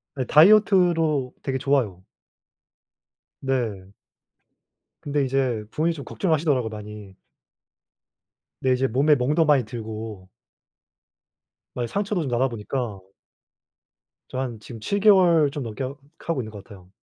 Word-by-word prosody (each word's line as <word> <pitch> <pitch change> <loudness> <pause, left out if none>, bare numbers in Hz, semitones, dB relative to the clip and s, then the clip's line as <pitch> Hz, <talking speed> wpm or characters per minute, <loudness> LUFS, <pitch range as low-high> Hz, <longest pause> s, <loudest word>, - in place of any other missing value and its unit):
네. 130 -2 -2
다이어트로 165 - +4
되게 135 -1 -1
좋아요. 125 -10 0 1.4
네. 115 -8 -2 1.1
근데 145 -1 -1
이제 130 -4 0
부모님이 165 +2 0
좀 140 -4 -9
걱정하시더라고요, 150 - 0
많이. 105 -2 -9 1.5
네. 130 -1 +2
이제 130 +1 +1
몸에 140 +5 +3
멍도 150 +5 +2
많이 145 -4 +4
들고 110 -4 -7 1.4
막 125 - -3
이 - - -2
상처도 200 - -2
좀 145 - -3
나다 125 +2 +2
보니까 115 -2 -4 1.3
저 - - -6
한 125 -4 -4
지금 115 +1 -10
7 200 - -1
개월 180 -7 +5
좀 145 -2 -5
넘게 115 +3 -5
하 130 +1 -4 0.3
하고 165 -6 -2
있는 110 -2 -8
것 105 -2 -10
같아요. 95 -5 -15
130 Hz, 250 characters per minute, -24 LUFS, 110-150 Hz, 1.5 s, 개월